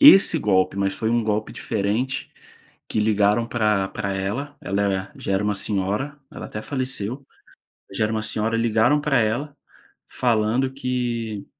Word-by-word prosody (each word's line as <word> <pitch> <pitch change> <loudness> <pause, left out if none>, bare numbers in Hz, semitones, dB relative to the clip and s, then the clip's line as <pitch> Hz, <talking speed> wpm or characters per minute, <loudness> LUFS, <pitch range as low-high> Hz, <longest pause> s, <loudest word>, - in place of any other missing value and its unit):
esse 195 - +8
golpe, 95 -6 +2
mas 100 0 0
foi 110 +3 -1
um 120 -1 +2
golpe 110 0 -1
diferente, 110 +5 -2 0.6
que - - -1
ligaram 105 +1 +3
pra 105 -4 +1
pra 100 -1 -3
ela, 120 +10 -3
ela, 100 +1 -1
eh, 95 0 -4
já - - -3
era 100 - +1
uma 105 0 +1
senhora, 105 +8 -1
ela - - -7
até 105 - -6
faleceu, 130 -1 -3 0.7
já 100 +3 0
era 110 - 0
uma 110 -1 -1
senhora, 110 +2 0
ligaram 115 +5 +3
pra 145 -2 +2
ela, 135 +7 -1 0.5
falando 120 +2 +1
que 120 -5 -2
110 Hz, 155 wpm, -23 LUFS, 105-130 Hz, 0.7 s, esse